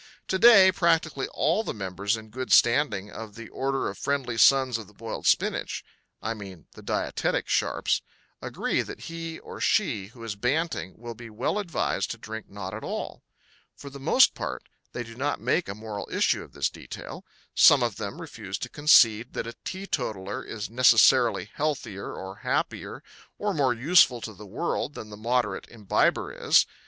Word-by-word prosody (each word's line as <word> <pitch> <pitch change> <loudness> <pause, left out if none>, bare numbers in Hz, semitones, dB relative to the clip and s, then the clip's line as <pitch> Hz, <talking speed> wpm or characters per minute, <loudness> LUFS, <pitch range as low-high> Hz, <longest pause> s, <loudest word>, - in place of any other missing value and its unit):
To 190 - 0
day 200 -5 +8
practically 165 -6 +1
all 170 +8 +1
the - - -4
members 100 +2 -2
in 110 0 -11
good 130 +2 -5
standing 115 -5 +3
of 110 -2 -9
the 115 -1 -9
Order 135 0 -1
of 100 - -6
Friendly 135 -4 -1
Sons 130 -1 +4
of 110 - -10
the 105 - -20
Boiled 115 +1 -5
Spinach - - +1 0.4
I 110 - -1
mean 95 -6 -10
the - - -13
dietetic - - -1
sharps - - +1 0.4
agree - - -1
that - - -8
he 165 -1 -6
or - - -10
she 100 -2 +1
who 115 +1 -14
is 110 -3 -4
banting 125 - -2
will 120 +1 -7
be 115 0 -11
well 110 - -1
advised 180 -6 -1
to - - -5
drink 110 0 -8
not 100 -1 -7
at 110 - -6
all. - - -5 0.5
For 140 - -10
the 140 - -9
most 165 - +5
part - - -5 0.3
they 120 - -4
do 115 0 -11
not 140 +5 -2
make 175 - 0
a 100 - -4
moral 105 -1 -6
issue - - +2
of - - -13
this - - -1
detail. - - -9 0.3
Some 140 -3 +7
of 115 -4 -1
them 110 +9 -5
refuse 110 - -6
to - - -6
concede 120 -6 +5
that - - -3
a 115 - -6
teetotaler 120 - -4
is 110 -1 -6
necessarily 120 +1 +4
healthier 130 -10 -3
or 95 +1 -8
happier - - -3 0.3
or 205 -1 -1
more 135 -6 +2
useful 130 -1 +5
to 110 - -6
the 105 +1 -12
world 145 - -3
than 110 - -8
the - - -7
moderate 115 -2 -1
imbiber 105 -4 0
is. - - +4
115 Hz, 180 wpm, -26 LUFS, 105-145 Hz, 0.5 s, day